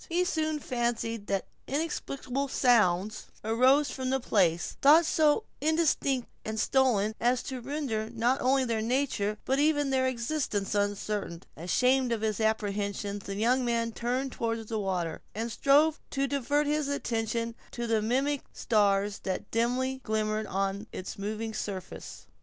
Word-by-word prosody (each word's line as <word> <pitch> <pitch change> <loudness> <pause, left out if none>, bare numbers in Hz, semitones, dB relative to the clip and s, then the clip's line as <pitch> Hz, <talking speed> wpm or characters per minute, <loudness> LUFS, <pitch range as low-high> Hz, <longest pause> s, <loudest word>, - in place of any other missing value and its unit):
He 345 +2 +2
soon 315 -4 0
fancied 235 -5 -2
that 195 -1 -1 0.2
inexplicable 275 -2 -2
sounds 215 -6 +2 0.2
arose 255 +6 +4
from 260 -1 -3
the 265 0 +1
place, 175 -8 +1
though 305 +4 +7
so 315 +4 +3 0.2
indistinct 300 -5 +1 0.2
and 220 0 -3
stolen, 220 -4 +2
as 245 +2 +2
to 260 -2 -5
render 245 -5 -3
not 240 +3 +1
only 265 +1 +3
their 230 -2 -1
nature 225 -4 0
but 265 +1 +1
even 290 -2 +2
their 260 -1 +2
existence 235 -5 -2
uncertain. 205 -3 -2
Ashamed 250 +9 +2
of 230 -2 -1
his 215 -1 -1
apprehensions, 205 -2 -1
the 195 - -4
young 245 +5 +2
man 230 -1 0
turned 250 +4 -2
toward 230 -2 -3
the 220 -1 -2
water, 180 -5 -2
and 230 +2 -3
strove 290 +6 +4
to 275 0 0
divert 285 +2 0
his 300 0 0
attention 230 -4 -2 0.2
to 240 - -4
the 225 -2 +1
mimic 270 +6 0
stars 205 -2 +1
that 190 +1 -4
dimly 255 +3 0
glimmered 215 -1 -1
on 195 +2 -2
its 185 - -7
moving 215 +2 -3
surface. 195 -3 -6
235 Hz, 145 wpm, -29 LUFS, 210-270 Hz, 0.2 s, though